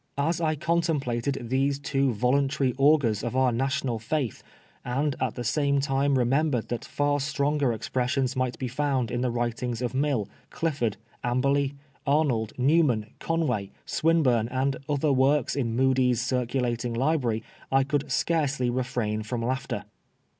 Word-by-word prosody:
As 160 Hz, +4 st, 0 dB
I 155 Hz, -1 st, +1 dB
contemplated 145 Hz, -6 st, 0 dB
these 135 Hz, +2 st, +1 dB
two 140 Hz, -1 st, 0 dB
voluntary 130 Hz, +3 st, +1 dB
augurs 135 Hz, -7 st, +3 dB
of 120 Hz, +1 st, -3 dB
our 130 Hz, -1 st, +3 dB
national 135 Hz, -1 st, -1 dB
faith, 130 Hz, +1 st, -2 dB, 0.4 s
and 135 Hz, +3 st, -1 dB
at -, -, -1 dB
the 120 Hz, -, -4 dB
same 140 Hz, +4 st, +1 dB
time 140 Hz, 0 st, +1 dB
remembered 130 Hz, 0 st, +1 dB
that 120 Hz, -, -3 dB
far 145 Hz, 0 st, 0 dB
stronger 140 Hz, -1 st, +1 dB
expressions 125 Hz, +3 st, -1 dB
might 130 Hz, -1 st, -1 dB
be 130 Hz, -, -3 dB
found 135 Hz, -2 st, -1 dB
in 120 Hz, -, -1 dB
the 125 Hz, -, +1 dB
writings 120 Hz, 0 st, -2 dB
of 125 Hz, 0 st, -2 dB
Mill, 135 Hz, -6 st, 0 dB, 0.2 s
Clifford, 140 Hz, -11 st, -1 dB, 0.3 s
Amberley, 140 Hz, +3 st, +1 dB, 0.3 s
Arnold, 135 Hz, -7 st, +2 dB
Newman, 125 Hz, -5 st, +2 dB
Conway, 155 Hz, -12 st, -1 dB, 0.2 s
Swinburne, 145 Hz, -9 st, +2 dB
and 130 Hz, +2 st, 0 dB
other 145 Hz, 0 st, +2 dB
works 135 Hz, 0 st, +2 dB
in 120 Hz, -5 st, -1 dB
Mudie's 130 Hz, -2 st, +3 dB
circulating 125 Hz, -1 st, -1 dB
library, 125 Hz, -4 st, +1 dB, 0.3 s
I 135 Hz, 0 st, +4 dB
could 140 Hz, +1 st, -2 dB
scarcely 140 Hz, -5 st, +1 dB
refrain 120 Hz, -4 st, -1 dB
from 115 Hz, +2 st, -3 dB
laughter. 130 Hz, +2 st, -2 dB
130 Hz, 140 wpm, -26 LUFS, 120-145 Hz, 0.4 s, I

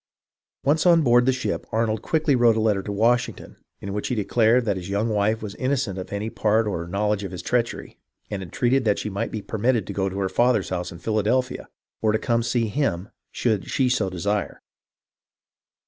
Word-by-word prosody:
Once 155 Hz, +5 st, +2 dB
on 170 Hz, -2 st, +6 dB
board 120 Hz, -1 st, +4 dB
the -, -, +5 dB
ship, 130 Hz, -, -3 dB
Arnold 110 Hz, -1 st, 0 dB
quickly 155 Hz, -1 st, +1 dB
wrote 120 Hz, -2 st, +4 dB
a -, -, +2 dB
letter 105 Hz, -3 st, +2 dB
to 100 Hz, -, -5 dB
Washington 115 Hz, +4 st, 0 dB, 0.2 s
in 100 Hz, -, -5 dB
which 105 Hz, -, -2 dB
he 125 Hz, -, -1 dB
declared 115 Hz, +3 st, +2 dB
that 100 Hz, -3 st, +1 dB
his 90 Hz, 0 st, -6 dB
young 100 Hz, +3 st, 0 dB
wife 110 Hz, +1 st, 0 dB
was 105 Hz, -2 st, -5 dB
innocent 130 Hz, -6 st, -1 dB
of 90 Hz, -, -7 dB
any 100 Hz, +2 st, -3 dB
part 110 Hz, +1 st, +2 dB
or 85 Hz, -5 st, -3 dB
knowledge 105 Hz, +2 st, 0 dB
of 95 Hz, -, -4 dB
his 90 Hz, -, -7 dB
treachery, 120 Hz, -1 st, -2 dB, 0.3 s
and 100 Hz, -2 st, -4 dB
entreated 120 Hz, +9 st, 0 dB
that 105 Hz, -2 st, +2 dB
she 105 Hz, -, -4 dB
might 100 Hz, -, -2 dB
be 110 Hz, -2 st, -5 dB
per 110 Hz, -, -5 dB
mitted 115 Hz, -2 st, +2 dB
to -, -, -6 dB
go 95 Hz, -1 st, 0 dB
to 95 Hz, -, -7 dB
her 95 Hz, -1 st, 0 dB
father's 120 Hz, -1 st, +2 dB
house 90 Hz, -1 st, -3 dB
in 85 Hz, -, -9 dB
Philadelphia, 110 Hz, +7 st, -1 dB, 0.3 s
or 110 Hz, -, +3 dB
to -, -, +3 dB
come 115 Hz, +1 st, 0 dB
to 120 Hz, -1 st, 0 dB
him 105 Hz, -6 st, -1 dB, 0.2 s
should 110 Hz, -5 st, -1 dB
she 130 Hz, -2 st, +1 dB
so 110 Hz, -6 st, +1 dB
desire. 100 Hz, +3 st, -2 dB
110 Hz, 210 wpm, -24 LUFS, 100-120 Hz, 0.3 s, on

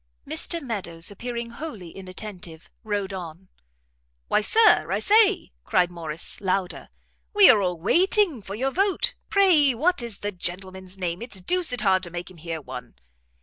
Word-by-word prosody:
Mr 335 Hz, -, +1 dB
Meadows, 195 Hz, -, -4 dB
appearing 235 Hz, +2 st, -5 dB
wholly 235 Hz, -, -8 dB
inattentive, 185 Hz, -3 st, -8 dB
rode 205 Hz, -2 st, -3 dB
on. 180 Hz, 0 st, -8 dB, 0.8 s
"Why, -, -, +3 dB
Sir, 440 Hz, -, +4 dB
I -, -, +1 dB
say!" 420 Hz, -2 st, +3 dB
cried 180 Hz, -1 st, +1 dB
Morrice, 165 Hz, -1 st, -5 dB
louder, 190 Hz, -1 st, -2 dB, 0.5 s
"we 410 Hz, -2 st, +9 dB
are 210 Hz, -, +3 dB
all 180 Hz, -3 st, -2 dB
waiting 350 Hz, -, +2 dB
for 195 Hz, 0 st, -7 dB
your 265 Hz, +5 st, -1 dB
vote. 390 Hz, +4 st, +1 dB, 0.2 s
Pray 330 Hz, -10 st, +4 dB
what 325 Hz, +5 st, +1 dB
is 235 Hz, -4 st, -4 dB
the 205 Hz, -, -2 dB
gentleman's 185 Hz, +1 st, -5 dB
name? 180 Hz, 0 st, -3 dB
it's 235 Hz, -5 st, -4 dB
deuced 320 Hz, -, +1 dB
hard 190 Hz, -3 st, +3 dB
to 175 Hz, -, -5 dB
make 175 Hz, +2 st, -7 dB
him 180 Hz, -, -16 dB
hear 165 Hz, 0 st, -5 dB
one." 125 Hz, -4 st, -9 dB
195 Hz, 155 wpm, -24 LUFS, 180-270 Hz, 0.8 s, we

